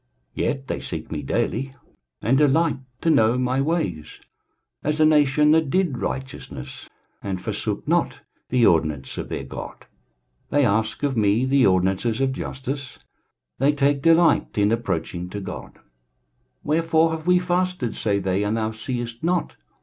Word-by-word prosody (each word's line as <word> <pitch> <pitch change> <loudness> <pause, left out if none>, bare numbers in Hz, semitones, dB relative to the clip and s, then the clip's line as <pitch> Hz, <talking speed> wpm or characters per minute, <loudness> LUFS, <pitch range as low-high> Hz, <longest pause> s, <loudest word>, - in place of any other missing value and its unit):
23:058:002 - - -3
Yet 135 -1 -4
they - - -3
seek - - -6
me - - -3
daily, 135 +3 -2 0.5
and 120 +6 +3
delight 150 +1 +3 0.2
to 165 - +3
know 115 -4 +4
my 130 +1 +1
ways, 100 - -2 0.6
as 150 +1 -1
a 155 - +6
nation 150 -1 +4
that 160 -2 +3
did 175 -7 +1
righteousness, 130 +6 -6 0.3
and 95 -2 -3
forsook - - -4
not - - +1 0.3
the 125 -2 +3
ordinance 75 -7 +1
of - - -5
their - - -4
God: - - -8 0.6
they 145 -2 +3
ask 110 +4 0
of 140 -2 +1
me 110 +2 +2
the 135 0 +4
ordinances 95 +5 +1
of 135 -1 +1
justice; 130 +1 -5 0.6
they 135 +3 +4
take 140 0 +1
delight 165 -3 +3
in 105 +1 +3
approaching 90 -6 -2
to 100 - -5
God. 95 - -7
23:058:003 - - -24 0.8
Wherefore 160 +1 +2
have 160 +1 -5
we 180 0 +5
fasted, 180 -7 -1
say 100 -2 0
they, 95 0 0
and 105 +2 0
thou 110 0 -1
seest 120 +2 -5
not? 175 +1 0
130 Hz, 155 wpm, -23 LUFS, 110-150 Hz, 0.8 s, a